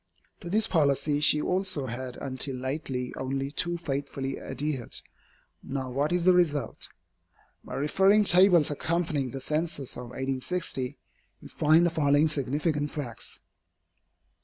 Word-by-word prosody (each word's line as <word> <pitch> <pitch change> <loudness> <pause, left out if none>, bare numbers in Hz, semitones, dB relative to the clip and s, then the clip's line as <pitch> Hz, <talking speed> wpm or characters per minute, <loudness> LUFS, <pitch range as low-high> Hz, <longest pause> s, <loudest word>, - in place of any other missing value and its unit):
To 170 - -8
this 215 +4 +3
policy 145 -2 +2
she 150 0 +6
also 185 -6 0
has 125 +1 -5
until 135 0 -1
lately 130 -1 -3
only 135 +1 -2
too 175 +3 -2
faithfully 140 -3 -4
adhered. 145 -5 -4 0.7
Now 130 -2 -4
what 145 +5 0
is 175 -1 +1
the 185 - +7
result? 150 -8 0 0.7
By - - -7
referring 190 +9 +4
to - - +1
the 175 - +3
tables 175 -6 +5
accompanying 155 -3 -1
the 135 - -6
Census 150 -1 -2
of 125 - -6
1860, 130 +2 -3 0.5
we - - -9
find 160 +3 +4
the 175 - +2
following 145 -1 +3
significant 150 +1 -1
facts. 135 -7 -6
145 Hz, 135 wpm, -28 LUFS, 135-165 Hz, 0.7 s, the